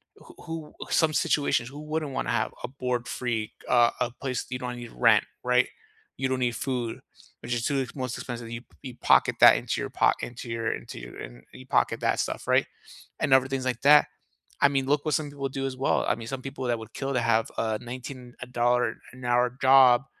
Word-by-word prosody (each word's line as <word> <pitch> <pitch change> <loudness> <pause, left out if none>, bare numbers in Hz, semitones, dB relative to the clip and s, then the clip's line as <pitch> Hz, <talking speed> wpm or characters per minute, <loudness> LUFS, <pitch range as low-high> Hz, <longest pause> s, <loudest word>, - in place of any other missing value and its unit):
who - - -16
who 160 -2 -7 0.2
some 160 -2 +3
situations, 140 -5 +1
who 145 - -10
wouldn't 155 -1 -3
wanna - - -2
have 115 -2 0
a - - -2
board 125 -2 -3
free, 115 -4 -2 0.2
a 120 -1 +5
a 125 0 +1
place 125 0 -4
you 125 - -4
don't 125 -1 -4
need 120 -1 -8
rent, 110 -3 +4 0.2
right? 125 0 +3 0.5
You 130 - 0
don't 130 - 0
need 120 -2 0
food, 125 -3 -3 0.4
which 120 - -3
is 115 - -2
too 140 -2 +1
the 125 - -9
most 130 -3 -3
expensive. 120 -1 -6
You 115 0 -5 0.2
you 130 -3 -7
pocket - - +4
that - - +9
into - - -2
your - - -3
pock - - +2
into 120 0 -7
your 115 0 -1
into - - -8
your - - -10
and - - -9 0.3
pocket - - +2
that - - +1
stuff, - - -3
right, - - +3 0.5
and 145 -4 +2
other 130 0 +5
things 135 -1 -3
like 125 -2 -2
that? 145 +1 +7 0.6
I 145 - +7
mean, 135 -1 0
look 145 +1 +1
what 155 - +1
some 150 -2 -2
people 140 -1 -4
do 135 +1 -3
as 135 -1 -3
well. 130 +1 +1
I - - +3
mean, 115 0 -8
some 135 0 -5
people 135 -1 -5
that 120 -1 +1
would 110 - -11
kill 135 0 -3
to 125 - +2
have 115 -1 +2
a 110 -1 -1
nineteen 125 0 -8
uh, 125 - -4
dollar-an-hour 120 +1 0
job 130 -1 +6
125 Hz, 215 wpm, -27 LUFS, 120-135 Hz, 0.6 s, that